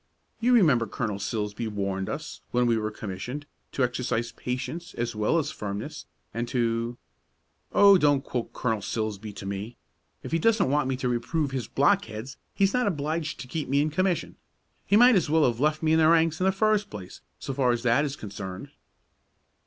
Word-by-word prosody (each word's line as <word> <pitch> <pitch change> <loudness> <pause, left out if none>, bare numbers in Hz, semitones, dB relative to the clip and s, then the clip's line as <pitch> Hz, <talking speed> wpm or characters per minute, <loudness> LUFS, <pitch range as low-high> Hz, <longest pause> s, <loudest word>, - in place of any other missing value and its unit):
You 245 +2 +3
remember 145 - +4
Colonel 105 -2 -3
Silsbee 105 +2 -3
warned 100 -2 -2
us, - - -6
when 125 0 +2
we 120 -1 +3
were 110 -1 -1
commissioned, 110 +7 -6 0.3
to 135 - +1
exercise 120 -1 -1
patience 130 +9 -5
as 120 -1 -2
well 105 +10 +2
as 160 - 0
firmness, 100 0 -6 0.3
and 120 +2 -2
to 120 -1 -1 0.4
" - - -46
"Oh, 200 -2 +7
don't 145 -3 +3
quote 120 -2 -4
Colonel 110 -4 -1
Silsbee 110 0 -3
to 95 - -8
me! 100 +4 -5 0.5
If - - -7
he 165 - +2
doesn't 215 -5 +3
want 150 -1 +2
me 130 - 0
to 130 - -2
reprove 135 +5 -1
his 130 -3 -3
blockheads 135 - 0 0.2
he's 195 0 +2
not 250 -2 +2
obliged 155 -3 -2
to 125 - -8
keep 150 +1 -4
me 140 +1 +3
in 150 +1 +1
commission. 185 +2 0 0.5
He 200 - +4
might 245 +2 +7
as 180 -5 +2
well 160 0 +4
have 120 -2 0
left 155 +2 +1
me 160 0 +3
in 160 - +4
the 155 - +5
ranks 165 -1 +3
in 185 - +3
the - - +5
first 210 +1 +1
place, 95 -3 -9 0.2
so 135 - -5
far 130 -2 +2
as 120 0 -1
that 125 +4 +3
is 145 -2 -2
concerned." 95 -5 -7
125 Hz, 195 wpm, -27 LUFS, 110-160 Hz, 0.5 s, Oh